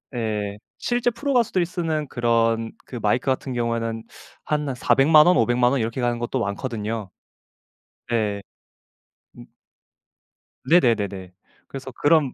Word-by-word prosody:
예. 105 -3 -2 0.2
실제 245 0 0
프로 280 +4 -3
가수들이 210 -8 +2
쓰는 165 -4 -2
그런 115 -2 +1
그 125 - -7
마이크 110 +4 +1
같은 130 0 -1
경우에는 115 -1 -2 0.4
한, 150 -1 -1
한 130 - -3
4,000,000 150 +5 +5
원, 180 - +5
5,000,000 120 0 +3
원 135 -3 +1
이렇게 115 +3 -2
가는 120 -1 0
것도 120 +2 -2
많거든요. 110 -1 -3 1.0
네. 105 -4 0 1.0
음. - - -11 1.2
네네네네. 100 - +2 0.3
그래서 135 -1 -8
그런 145 0 +2
120 Hz, 240 characters per minute, -23 LUFS, 115-150 Hz, 1.2 s, 4,000,000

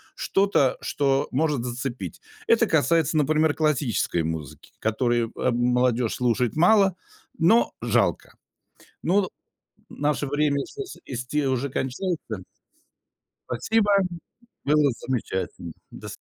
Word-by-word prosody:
что-то, 195 - +2
что 135 -1 0
может 145 -2 0
зацепить. 120 - -5 0.3
Это - - +4
касается, 160 +2 +2
например, 155 +1 +3
классической 135 - 0
музыки, 80 -4 -6
которую, 120 +1 0
эм, 120 -1 0
молодежь 125 -1 +1
слушает 125 -1 0
мало, 190 +3 +4 0.4
но 185 +8 +4
жалко. - - 0 0.7
Нод 190 +1 +2 0.6
в - - -14
наше 145 0 +1
время 145 0 +1
слушать 410 -2 -9
исти 130 +3 -2
уже 130 +1 0
кончается. 130 - -3 1.1
Спасибо. 220 -2 +1 0.7
Было 150 -1 +4 0.2
замечательно, 95 -8 -3 0.2
до - - -9
с - - -9
135 Hz, 105 wpm, -25 LUFS, 120-155 Hz, 1.1 s, Это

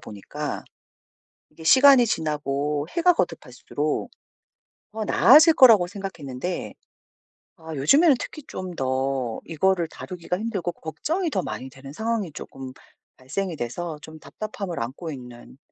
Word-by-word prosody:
보니까 100 -2 -6 0.9
이게 160 +1 -14
시간이 265 - +7
지나고 150 -4 -2
해가 350 +1 +4
거듭할수록 - - -3 0.8
더 220 0 -4
나아질 305 - +7
거라고 225 -10 +7
생각했는데 180 -5 -5 0.8
아 160 -2 -8
요즘에는 275 - +5
특히 305 - -7
좀 185 -1 -6
더 130 -3 -1
이거를 170 +1 +1
다루기가 180 +1 -5
힘들고 205 -6 -2
걱정이 320 - -3
더 195 -11 -1
많이 130 - -6
되는 135 +1 -12
상황이 220 -2 -2
쪼금 130 -2 -9 0.4
발생이 165 +7 -4
돼서 155 +6 -5
좀 155 0 -11
답답함을 200 -3 -6
안고 140 +8 -5
있는 125 -2 -11
170 Hz, 290 characters per minute, -24 LUFS, 135-215 Hz, 0.9 s, 시간이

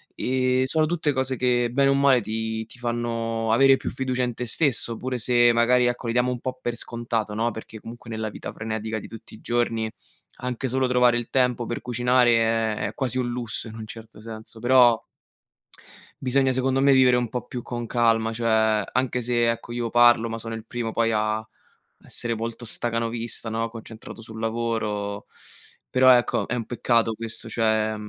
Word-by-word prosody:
Ehm, 130 0 +1
sono 155 +3 +2
tutte 165 -3 0
cose 130 0 0
che 120 -1 +1
bene 135 +2 +3
o 140 - +4
male 135 -3 +4
ti 110 +1 -3
ti 125 - -14
fanno 115 -1 -2
avere 135 +3 +6
più - - -4
fiducia 130 -1 -1
in 125 -1 -1
te 125 - -4
stesso 120 -3 +1
oppure 125 +2 -4
se 120 0 +4
magari, 125 +1 +3
ecco, 120 0 -3
li 115 - -1
diamo 125 +1 +2
un 125 - -4
po' 130 0 -4
per 120 - -2
scontato, 115 -2 -3
no, 115 +2 0
perché 110 0 -9
comunque 115 +1 -11
nella 110 -1 -3
vita - - -7
frenetica 110 0 -4
di - - -10
tutti 115 0 -12
i - - -15
giorni 115 -2 0 0.5
anche 125 +1 -3
solo 130 +1 +1
trovare 125 -1 +4
il 120 - -7
tempo 125 -2 +1
per 120 - -4
cucinare 125 -1 +3 0.5
è - - 0
è - - -11
quasi 130 -1 -1
un 125 - -1
lusso 120 -1 -3
in 110 - -9
un 110 -1 -7
certo 110 -1 -11
senso. 110 0 -9
Però 120 -2 +5 1.2
bisogna, 135 +1 +2
secondo 130 +1 +1
me, 140 - +5
vivere 130 -1 +5
un 120 -1 0
po' 125 - -5
più 120 -2 -6
con 120 -1 -5
calma, 115 -1 +2
cioè 110 -2 +2
anche 125 0 0
se, 120 -1 +2
ecco, 115 0 -3
io 120 -1 -2
parlo 120 -1 +5
ma 115 - -4
sono 115 0 -6
il 110 -1 -6
primo 120 -2 -3
poi 115 -1 +1
a 110 0 0
a 110 - -13 0.6
essere 120 -1 -2
volto 115 +2 -5
stacanovista, 115 0 -2
no, 115 +1 -2
concentrato 115 0 -10
sul 110 0 -9
lavoro, 110 -3 -2 0.6
però, 130 0 +6
ecco, 120 - 0
è - - -3
un 120 -3 -2
peccato 115 -2 +1
questo. 115 0 -6
Cioè, 110 -1 +1
120 Hz, 190 wpm, -24 LUFS, 115-125 Hz, 1.2 s, avere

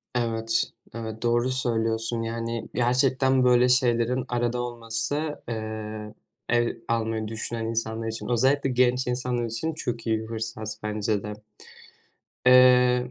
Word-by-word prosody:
Evet, 115 -1 +1 0.3
evet 110 -1 -6
doğru 120 +1 +2
söylüyorsun 115 -2 0
yani 115 0 -4
gerçekten, 130 +1 +2
böyle, 125 0 +5
şeylerin 125 0 +2
arada 120 0 -1
olması, 120 +6 -3
eee, 110 -1 -5 0.4
ev 120 0 +2
almayı 110 -1 -1
düşünen 115 +1 -3
insanlar 115 0 -2
için, 110 0 -4
özellikle 135 +3 +2
genç 125 0 +2
insanlar 125 -1 -1
için 115 +8 -3
çok 120 -6 -4
iyi 110 -1 +2
bir 110 - -7
fırsat 110 -1 -5
bence 105 -1 -1
de. 105 - -5 1.1
Eee, 125 -1 +6
115 Hz, 125 wpm, -26 LUFS, 110-125 Hz, 1.1 s, Eee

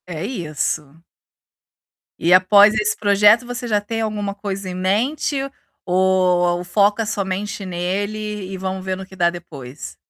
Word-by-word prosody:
É 170 -2 -5
isso. 155 - -3 1.2
E 170 +2 +3
após 200 +3 +6
esse 210 -1 +1
projeto, 210 +3 +4
você 245 0 -5
já 210 -2 +1
tem 225 +2 -4
alguma 210 -2 -2
coisa 200 -2 -5
em 180 - -5
mente 225 +11 0 0.5
ou 180 -1 +2
foca 205 +4 +2
somente 200 0 -3
nele 200 +3 -3
e 190 - -5
vamo 190 0 -4
ver 190 0 -3
no 190 +1 -8
que 190 - -15
dá 175 -2 +3
depois? 150 -6 -9
190 Hz, 145 wpm, -20 LUFS, 180-210 Hz, 1.2 s, após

